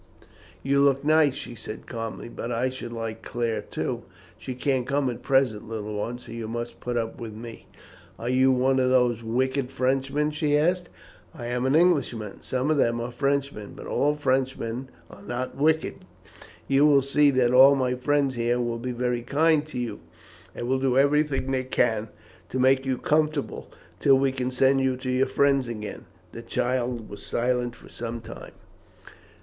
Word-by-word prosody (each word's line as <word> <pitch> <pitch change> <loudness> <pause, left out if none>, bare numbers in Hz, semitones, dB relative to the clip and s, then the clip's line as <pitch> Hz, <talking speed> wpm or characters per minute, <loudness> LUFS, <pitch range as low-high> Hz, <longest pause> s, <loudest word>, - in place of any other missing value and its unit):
"You 140 +1 +2
look 140 0 +3
nice," 155 -3 +4
she 120 - -7
said 110 -2 -8
calmly, 115 -2 -6
"but 120 0 -6
I 125 +2 0
should 125 -2 -7
like 115 -1 -5
Claire, 120 -2 -2
too." - - -4 0.3
"She 130 - -7
can't 130 -1 0
come 140 -2 +1
at 120 - -8
present, 125 -5 +1
little 105 -1 -5
one, 110 +4 -3
so 125 - -13
you 115 -1 -5
must 120 +1 -5
put 120 -1 -3
up 115 0 -3
with 115 -2 -6
me." 115 +1 -10 0.5
"Are 115 - -6
you 130 +1 +4
one 130 +1 +2
of 130 -1 +2
those 125 -3 +3
wicked 130 +3 -1
Frenchmen?" 135 +3 0
she 150 -1 +1
asked. 175 +3 +1 0.5
"I 120 -6 -7
am 125 +1 0
an 135 - +2
Englishman. 135 - +1
Some 130 +4 -1
of 155 - +2
them 115 -3 +2
are 120 +1 -4
Frenchmen, 140 -4 -2
but - - -9
all 145 +1 +1
Frenchmen 130 -3 -1 0.2
are 100 - -14
not 120 +4 -4
wicked. 155 +3 +1 0.7
You 140 +2 +5
will 140 -2 +5
see 145 +2 +4
that 125 -3 +2
all 135 +2 +8
my 130 -2 0
friends 140 +1 +1
here 120 0 0
will 120 -1 -2
be 125 +2 -3
very 125 0 -1
kind 150 +5 +2
to 155 - -7
you, 120 -4 -3 0.6
and 120 - -4
will 130 +1 +1
do 130 -1 +1
everything 140 -1 +2
they 130 -1 0
can 110 -4 +1 0.4
to - - -3
make 130 +1 +3
you 130 -1 0
comfortable, 150 0 0 0.3
till 135 -1 +5
we 135 0 +2
can 130 -1 -2
send 135 +1 +3
you 130 -1 +1
to 130 0 -3
your 130 +1 +2
friends 140 -2 +2
again." 105 -3 -6 0.3
The 115 - -8
child 120 -1 -2
was 100 - -10
silent 120 0 -1
for - - -16
some 115 0 -5
time. 115 - -10
130 Hz, 185 wpm, -26 LUFS, 120-140 Hz, 0.7 s, all